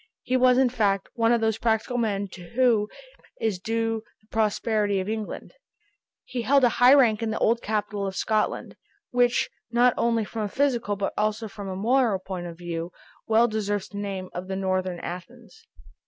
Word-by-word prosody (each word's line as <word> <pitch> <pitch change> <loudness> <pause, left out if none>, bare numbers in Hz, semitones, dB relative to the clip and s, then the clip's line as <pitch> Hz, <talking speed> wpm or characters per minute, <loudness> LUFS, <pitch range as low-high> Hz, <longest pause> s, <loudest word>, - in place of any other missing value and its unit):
He 255 - 0
was 255 0 +5
in 260 -1 +4
fact 205 -5 0
one 230 -1 +2
of 235 -1 +3
those 220 0 +1
practical 230 +2 0
men 205 -3 0
to 180 -1 -11
whom 235 -5 +3 0.5
is 215 -5 -1
due 225 +2 -1 0.2
the 215 - -31
prosperity 210 -2 +1
of 185 - -3
England. 220 -1 -5 0.7
He 245 - -4
held 275 +3 +3
a 245 - +6
high 250 +3 +9
rank 235 -6 +4
in 225 - -1
the 220 - -2
old 230 +1 +2
capital 210 -1 -2
of 190 - -5
Scotland, 215 +1 -1 0.3
which 245 -1 +2 0.2
not 240 +1 +4
only 230 -2 +1
from 225 +1 -5
a 210 - -2
physical 240 -5 0
but 200 0 -2
also 215 +1 0
from 200 -2 -8
a 190 - -4
moral 230 +1 +2
point 185 -2 -6
of 170 -1 -9
view, 170 0 -5 0.4
well 225 +2 +4
deserves 205 -3 -2
the 200 - -7
name 195 -2 -5
of 180 +1 -5
the 190 - -3
Northern 185 -2 -1
Athens. 175 0 -9
215 Hz, 185 wpm, -25 LUFS, 195-235 Hz, 0.7 s, high